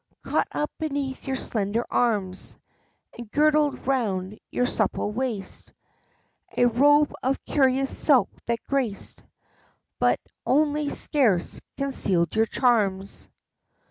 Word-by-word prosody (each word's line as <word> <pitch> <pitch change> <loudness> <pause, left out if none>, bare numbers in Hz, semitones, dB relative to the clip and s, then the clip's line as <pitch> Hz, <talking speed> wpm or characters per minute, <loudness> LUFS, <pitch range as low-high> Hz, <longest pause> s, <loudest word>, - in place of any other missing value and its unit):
Caught - - 0
up 295 - -2
beneath 280 -4 -3
your 265 - 0
slender 220 -2 -1
arms, 200 -6 -1 0.6
and 235 -3 -9
girdled 300 +2 +2
'round 210 -7 -1
your 250 - 0
supple 210 - 0
waist, 225 -4 -4 0.8
A 245 - +5
robe 290 +5 +4
of 265 +1 0
curious 270 -1 +2
silk 275 -5 +3 0.2
that 235 0 -1
graced, 255 -8 -2 0.8
but - - +3 0.2
only 295 +1 +1
scarce 230 - +1 0.2
concealed 200 -11 0
your 220 0 +3
charms. 200 -7 0
250 Hz, 110 wpm, -25 LUFS, 210-275 Hz, 0.8 s, A